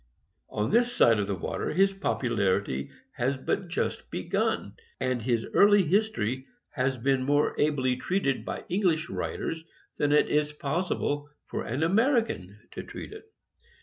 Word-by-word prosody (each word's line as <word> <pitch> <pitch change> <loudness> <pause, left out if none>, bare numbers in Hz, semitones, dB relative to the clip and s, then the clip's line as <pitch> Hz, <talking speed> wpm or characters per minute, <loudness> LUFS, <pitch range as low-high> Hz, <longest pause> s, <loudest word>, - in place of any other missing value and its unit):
On 105 +3 -1
this 240 +1 +3
side 115 - +4
the 100 - -1
water 85 - -3
his 195 +3 +4
popularity 100 - 0 0.3
has 130 +3 0
but 180 +8 -2
just 175 - -2
begun, - - -1 0.3
and 130 -2 0
his 115 -1 0
early 205 -1 +6
his 200 +7 +2
tory 130 - -3 0.2
has 130 -1 0
been 130 +2 +1
more 145 +3 +2
ably 130 -4 +1
treated 155 -4 0
by - - -5
English 175 -3 +1
writers 160 0 -3 0.3
than 145 -1 +1
it 150 - +5
is 150 0 +1
possible 145 -1 -2 0.2
for - - -4
an 130 +7 -1
American 210 - +1
to - - -6
treat - - -9
it. 435 0 -13
145 Hz, 150 wpm, -28 LUFS, 125-185 Hz, 0.3 s, early